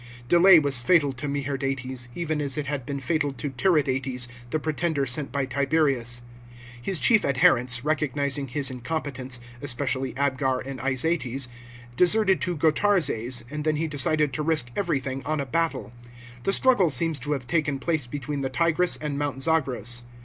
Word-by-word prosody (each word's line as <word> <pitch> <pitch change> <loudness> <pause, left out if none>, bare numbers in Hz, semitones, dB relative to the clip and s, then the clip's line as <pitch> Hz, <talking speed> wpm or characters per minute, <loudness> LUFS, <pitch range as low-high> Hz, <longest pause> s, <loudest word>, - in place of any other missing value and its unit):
Delay 175 +4 +7
was 140 -5 +2
fatal 145 +1 +3
to 130 +3 -6
Meherdates, 135 -3 -3
even 155 -3 -2
as 140 -1 0
it 150 - -2
had 140 -2 -4
been 140 -1 -3
fatal 145 +1 0
to 140 +1 -5
Tiridates, 130 -5 0 0.2
the 155 - 0
pretender 155 -1 -1
sent 135 +2 0
by 140 0 -1
Tiberius. 135 -3 0 0.6
His 180 +6 -2
chief 225 -3 +4
adherents, 125 -2 +3
recognising 145 -2 0
his 135 +1 -1
incompetence, 130 -1 -4 0.2
especially 135 -1 -1
Abgar 130 -1 0
and 135 -1 -6
Izates, 135 -1 -1 0.5
deserted 190 - +4
to 175 -1 -1
G 160 - +2
otarzes, 150 - +1
and 150 0 -4
then 155 0 +1
he 160 +2 -1
decided 150 -1 +1
to 150 - -2
risk 150 -6 0
everything 135 -8 -2
on 155 -1 -2
a 140 - -2
battle. 165 -3 -2 0.5
The 195 - +2
struggle 225 -10 +4
seems 155 +2 +1
to 145 +4 -2
have 135 -4 -4
taken 150 -1 0
place 155 -3 -1
between 145 +2 -4
the 135 - -2
Tigris 170 +4 +1
and 145 -2 -4
Mount 140 -2 -2
Zagros. 130 -6 0
140 Hz, 165 wpm, -25 LUFS, 130-155 Hz, 0.6 s, Delay